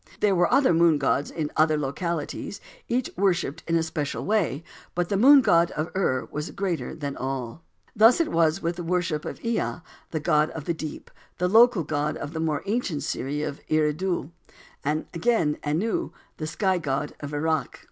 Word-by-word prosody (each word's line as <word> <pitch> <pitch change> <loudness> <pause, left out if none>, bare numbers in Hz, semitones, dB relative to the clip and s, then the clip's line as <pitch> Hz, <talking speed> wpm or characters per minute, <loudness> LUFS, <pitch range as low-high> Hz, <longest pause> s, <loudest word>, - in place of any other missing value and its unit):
There 210 -2 +3
were 175 -1 +2
other 275 -9 +4
moon 165 -2 +4
gods 145 0 0
in 155 -2 -3
other 155 0 +3
localities, 155 +6 -3 0.3
each 250 +1 -1
worshipped 175 -5 0
in 165 - +1
a 165 - +2
special 155 -3 -3
way, 185 -8 0 0.3
but 175 0 -1
the 200 - +1
Moon 270 +7 +8
God 170 -7 +4
of 155 +2 -2
Ur 130 -9 0
was 150 +1 -4
greater 185 -5 -3
than 145 -3 -4
all. 130 +2 -4 0.3
Thus 225 +6 +6
it 335 - +1
was 165 +2 +2
with 170 +1 -1
the 175 - -4
worship 170 -3 -1
of - - -6
Ea, 230 -5 -1 0.3
the 160 - -2
god 150 +1 +2
of 155 -2 -7
the 170 - 0
deep, 155 -2 -7 0.3
the 180 - +1
local 225 -1 +5
god 150 0 -1
of 145 +3 -6
the 160 - -3
more 155 -3 -1
ancient 200 -8 -1
city 145 +3 -2
of 145 -2 -4
Eridu; 155 +1 0 0.5
and 150 +2 -1
again 170 -4 +2
of - - -12
Anu, 185 +10 0 0.3
the 155 - -4
Sky 190 +2 0
God 145 -1 -2
of 145 0 -6
Erech. 160 +2 -1
165 Hz, 190 wpm, -25 LUFS, 150-185 Hz, 0.5 s, Moon